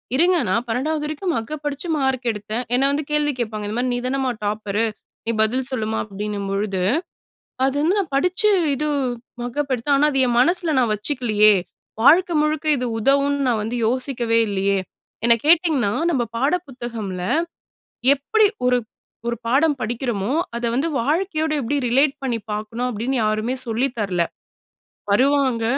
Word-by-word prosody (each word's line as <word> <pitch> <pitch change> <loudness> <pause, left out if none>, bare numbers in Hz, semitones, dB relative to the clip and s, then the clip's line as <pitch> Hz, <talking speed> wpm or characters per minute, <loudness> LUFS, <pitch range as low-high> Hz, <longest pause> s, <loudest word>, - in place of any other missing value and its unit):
"இருங்க 350 +4 +4
நான் 230 +6 +1
12வது 295 +6 -1
வரைக்கும் 315 +4 -2
மக்கப் 295 +6 -5
அடிச்சு 290 +5 -6
மார்க் 265 -3 0
எடுத்தேன்," 215 +3 -4
என்னை 270 +2 +2
வந்து 290 +1 -1
கேள்வி 295 -1 +1
கேட்பாங்க, 215 -3 -3
இந்த 215 +3 -3
மாதிரி. 250 0 0
"நீதானம்மா 255 +1 -1
டாப்பர், 210 +1 -1 0.4
நீ - - +2
பதில் 255 +4 +1
சொல்லுமா," 220 -3 -2
அப்படின்னும்பொழுது, 200 -1 -3 0.9
அது 270 +1 -1
வந்து 360 +6 +2
'நான் 330 -8 -2
படிச்சு 360 +7 +2 0.2
இது 300 +3 -2 0.6
மக்கப் 275 +3 -2
எடுத்தேன், 275 +4 +1
ஆனா, 300 +1 +4
அது 270 - 0
என் 235 - 0
மனசில 340 +1 +2
நான் 230 -3 +2
வச்சுக்கலையே, 215 -3 +3 0.5
வாழ்க்கை 345 +6 +6
முழுக்க 305 0 -1
இது 250 0 -2
உதவும்னு 280 +4 +2
நான் 225 -3 +1
வந்து 235 +3 -3
யோசிக்கவே 240 -2 0
இல்லையே,' 195 0 0 0.4
என்னை 235 0 +6
கேட்டிங்கன்னா 315 - +3 0.2
நம்ம 260 -7 +1
பாட 275 +8 +2
புத்தகமில 225 -8 -5 0.9
எப்படி 430 +11 +2 0.2
ஒரு 250 0 +4 0.5
ஒரு 235 - -1
பாடம் 290 +5 +3
படிக்கிறோமோ, 235 -2 -2 0.3
அதை 235 0 -2
வந்து 285 +6 +1
வாழ்க்கையோட 315 +3 0
எப்படி 275 +4 -1
ரிலேட் 270 +4 +3
பண்ணி 240 -4 -1
பாக்கணும் 220 +4 -3
அப்படின்னு 240 +4 -2
யாருமே 215 +4 0
சொல்லி 240 +4 0
தரல, 185 -5 0 0.9
வருவாங்க, 260 0 +2
250 Hz, 145 wpm, -21 LUFS, 220-290 Hz, 0.9 s, வாழ்க்கை